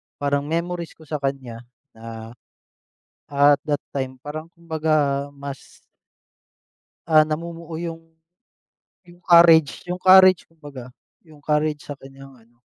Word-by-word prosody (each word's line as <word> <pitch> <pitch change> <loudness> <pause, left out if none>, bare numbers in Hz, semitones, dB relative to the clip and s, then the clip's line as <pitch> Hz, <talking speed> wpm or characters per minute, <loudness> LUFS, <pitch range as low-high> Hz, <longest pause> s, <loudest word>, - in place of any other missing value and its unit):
parang 145 0 -2
memories 170 +1 -4
ko 160 - -17
sa 150 -1 -5
kanya 135 -4 -4 0.3
na, 115 0 -10 1.0
at 145 0 +4
that 145 -1 0
time, 130 -1 -4
parang 155 +4 -8
kumbaga 155 -4 -1
mas 140 -1 -10 1.3
Ah, 155 -2 +6
namumuo 165 +1 -6
yung 165 -1 -6 1.0
yung 175 0 -19
courage, 170 -4 +5
yung 180 +1 -5
courage, 185 -1 +6
kumbaga, 145 -6 -12 0.4
yung 150 -2 -18
courage 150 0 -1
sa 145 - -8
kanyang 135 0 -14
ano 120 +1 -28
150 Hz, 120 wpm, -22 LUFS, 140-165 Hz, 1.3 s, Ah